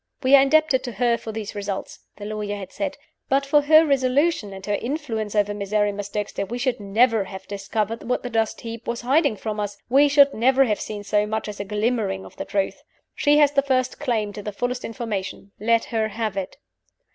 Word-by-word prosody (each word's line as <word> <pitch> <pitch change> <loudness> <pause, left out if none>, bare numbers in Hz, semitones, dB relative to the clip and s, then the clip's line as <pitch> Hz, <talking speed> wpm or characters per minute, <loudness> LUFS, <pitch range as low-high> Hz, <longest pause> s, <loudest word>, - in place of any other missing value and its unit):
"We 260 +2 +7
are 275 - +8
indebted 275 -2 +3
to 245 - -5
her 240 0 +2
for 225 - -7
these 215 -1 -5
results," 200 -1 -5 0.2
the 205 - -9
lawyer 210 -1 -3
had 195 -2 -8
said. 290 -1 -4 0.3
"But 275 +1 +2
for 290 +1 +4
her 310 +2 +6
resolution; 275 -3 +1
and 190 0 -9
her 205 - -1
influence 230 -4 -3
over 205 0 +2
Miserrimus 205 0 -1
Dexter, 205 -1 -3
we 230 +5 -5
should 250 -1 -1
never 215 +1 +2
have 190 0 -9
discovered 210 +2 -3
what 250 - 0
the 245 - -5
dust 225 -1 0
heap 230 0 -8
was 235 0 -2
hiding 275 0 +2
from 210 +1 -4
us 205 -1 -3
we 280 +3 +5
should 280 -1 +5
never 260 +4 +4
have 210 -4 -1
seen 210 -1 -5
so 210 +1 +1
much 220 +1 -2
as 210 -1 -7
a 200 - -3
glimmering 210 -2 -1
of - - -14
the - - -4
truth. 195 -1 -2 0.3
She 290 0 +3
has 295 -2 +5
the 280 -1 +3
first 260 -2 0
claim 225 -7 -1
to 210 - -7
the 210 - -5
fullest 245 +4 -3
information. 210 -4 -5
Let 230 +2 +2
her 220 -1 +1
have 215 -1 -3
it." 195 -2 -4
225 Hz, 215 wpm, -23 LUFS, 205-260 Hz, 0.3 s, are